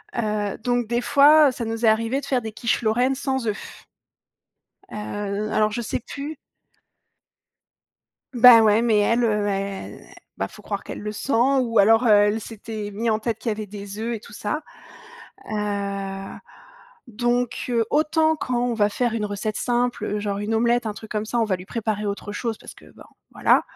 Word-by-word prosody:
Heu, 210 -3 -1
donc 245 0 0
des 240 +1 0
fois 285 +3 +6
ça 240 -2 -5
nous 225 +1 -2
est - - +5
arrivé 230 +5 +1
de - - -8
faire 260 -3 0
des 220 -1 -6
quiches 230 +2 -1
lorraines 245 +4 +2
sans 265 -3 -2
œufs. 210 -1 -6 1.1
Heu, - - -7 0.5
l - - -6
alors 215 0 +2
je 240 - -3
sais 225 - -3
plus 285 +6 -7 2.0
Bah, 240 -2 +8
ouais 215 +1 +4
mais 230 -2 +3
elle, 230 +4 +2
heu, 210 -2 +1
elle 195 -1 -4 0.3
bah, - - -2
faut - - -15
croire - - -4
qu'elle - - -7
le 210 0 -4
sent 240 +6 -4 0.3
ou 230 -2 -1
alors 225 +4 +5
elle 210 +1 +4
s'était 215 -1 -7
mis 225 +3 -1
en 215 - +1
tête 225 -1 -2
qu'il 225 - -4
y - - +1
avait 215 0 -5
des 200 0 -8
œufs 230 +1 -2
et - - -6
tout - - -15
ça. 260 +9 -3 0.9
Heu, 200 -2 -3 0.7
donc 240 +1 -1
heu, 230 -2 +1
autant 315 +1 +2
quand 250 -4 -1
on 245 -1 0
va 205 -2 +2
faire 240 +2 -1
une 220 -2 -1
recette 210 +1 -3
simple, 245 0 0
heu, 210 - -2
genre 200 -1 -3
une 210 +2 -2
omelette, 235 +1 +2
un 215 - -3
truc 215 +2 -11
comme 215 0 -2
ça 240 - -3
on - - +3
va 200 -3 0
lui 180 - -11
préparer 215 -2 -2
autre 200 0 -4
chose 225 0 -3
parce - - -12
que, - - -17
ben - - -15 0.3
voilà. - - +3
225 Hz, 195 wpm, -23 LUFS, 210-245 Hz, 2.0 s, Bah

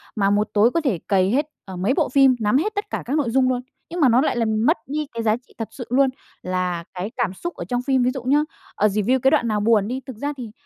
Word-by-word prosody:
mà 200 -2 +2
một 210 +1 +1
tối 220 +4 +4
có 335 - 0
thể 235 - 0
cày 190 0 +2
hết, 290 +4 +1 0.2
à, 190 - -8
mấy 190 +8 +1
bộ - - +1
phim, 270 -1 +5
nắm 215 +4 +2
hết 425 +8 -1
tất 410 0 -3
cả - - -3
các 270 +5 -1
nội 265 -6 0
dung 255 +1 +3
luôn. 250 -1 0 0.3
Nhưng 345 +1 -5
mà 265 -5 +5
nó 245 +3 +4
lại 295 - 0
làm 220 0 +1
mất 320 - +4
đi 300 +1 -3
cái 230 -1 -3
giá 215 0 +3
trị - - -23
thật 225 - -4
sự 245 - -8
luôn, 265 +1 +3 0.3
là 180 -2 -2
cái 185 +4 -4
cảm 215 -6 0
xúc 345 - -5
ở - - -6
trong 245 -1 -1
phim. 260 -1 +1
Ví 250 - +2
dụ 260 -2 -6
nhá, 290 +4 +3 0.3
ờ, 210 - +3
review 215 +6 +1
cái 265 +2 +3
đoạn 290 -6 +2
nào 215 -2 0
buồn 210 -1 +3
đi 255 +2 -3
thực 260 -5 -9
ra 290 +4 -3
thì 235 -4 -7
245 Hz, 295 wpm, -22 LUFS, 210-270 Hz, 0.3 s, phim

